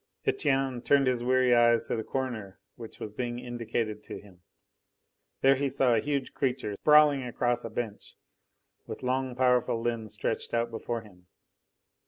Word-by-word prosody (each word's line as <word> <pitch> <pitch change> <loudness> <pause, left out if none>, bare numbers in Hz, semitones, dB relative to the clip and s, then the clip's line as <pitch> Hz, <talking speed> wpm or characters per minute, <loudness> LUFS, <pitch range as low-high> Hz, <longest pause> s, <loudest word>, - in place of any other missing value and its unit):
Etienne 135 -3 0
turned 140 +2 +3
his 125 -2 +1
weary 130 0 +3
eyes 120 -1 +4
to - - -3
the 110 - -3
corner 110 -9 -4 0.2
which 115 -2 -11
was 105 - -6
being 120 +2 -4
indicated 115 -3 -3
to - - -8
him. 95 -4 -18 1.0
There 135 +1 +6
he 140 +1 -1
saw 130 -2 +3
a 115 - +3
huge 140 +1 -2
creature 125 -6 -2
sprawling 150 +4 +5
across 120 -1 -1
a 115 - -5
bench, 110 -2 -6 0.7
with - - -7
long, 130 0 -1
powerful 125 -2 +2
limbs 115 -3 -3
stretched 110 +2 -3
out 115 0 0
before 115 0 -4
him. 90 -5 -19
120 Hz, 160 wpm, -28 LUFS, 115-130 Hz, 1.0 s, There